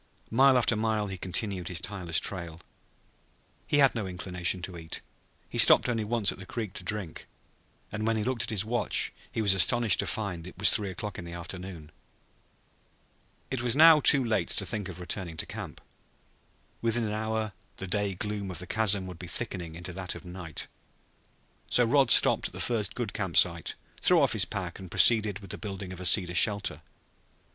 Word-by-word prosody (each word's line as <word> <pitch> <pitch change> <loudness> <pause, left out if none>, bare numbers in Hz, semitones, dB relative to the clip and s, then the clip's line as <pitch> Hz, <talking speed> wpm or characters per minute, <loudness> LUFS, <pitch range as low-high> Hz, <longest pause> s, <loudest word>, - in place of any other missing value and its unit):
Mile 130 +3 +5
after 120 -1 +2
mile 110 -1 -1
he 95 -2 -6
continued 95 -1 -3
his 90 -2 -2
tireless 90 -4 -2
trail. 85 -4 -5 1.1
He - - +1
had 140 -2 +5
no 110 -5 -4
inclination 90 -1 -2
to 90 0 -6
eat. 80 -1 -7 0.5
He - - -3
stopped - - +8
only 115 -3 -1
once 105 -1 +2
at - - -11
the 95 - -10
creek 110 -5 -5
to - - -5
drink. 105 -7 -5 0.6
And 110 +1 -3
when 115 0 +1
he 105 - -1
looked 125 0 -2
at - - -2
his 105 -2 -2
watch 120 +2 -1 0.2
he 110 - -2
was 100 -2 +5
astonished 110 +2 +3
to - - -1
find 95 -6 -3
that 90 - -8
it - - -17
was 100 - +6
three 105 -2 +1
o'clock 100 +2 -6
in 90 - -8
the 85 - -8
afternoon. 85 -2 -8 1.6
It 130 -2 -2
was 120 0 +1
now 160 +1 +7
too 140 -1 +6
late 110 -2 0
to 100 - +1
think 100 0 0
of 90 - -9
returning 90 -2 -5
to - - -3
camp. - - -8 1.0
Within 115 0 0
an 105 - -3
hour 110 -1 -3 0.2
the 95 - -5
day 100 +1 -2
gloom 105 0 -4
of 90 - -7
the 90 - -7
chasm 100 -2 +1
would 90 -2 -9
be 90 - -8
thickening 90 -5 -2
into 90 +1 -6
that 95 0 -5
of - - -11
night. 90 -3 -8 1.0
So 120 - +3
Rod 135 +3 +3
stopped - - +6
at - - -9
the - - -8
first 110 -6 -1
good 120 -5 -4
camp 95 -5 -3
site, 85 -2 +2 0.3
threw - - +5
off - - +2
his - - +3
pack, - - -6
and 95 -2 -10
proceeded 105 0 +3
with 95 -3 -11
the - - -7
building 95 -3 -6
of 90 - -10
a 95 - 0
cedar 90 -2 +3
shelter. 95 -3 +1
100 Hz, 200 wpm, -28 LUFS, 90-110 Hz, 1.6 s, stopped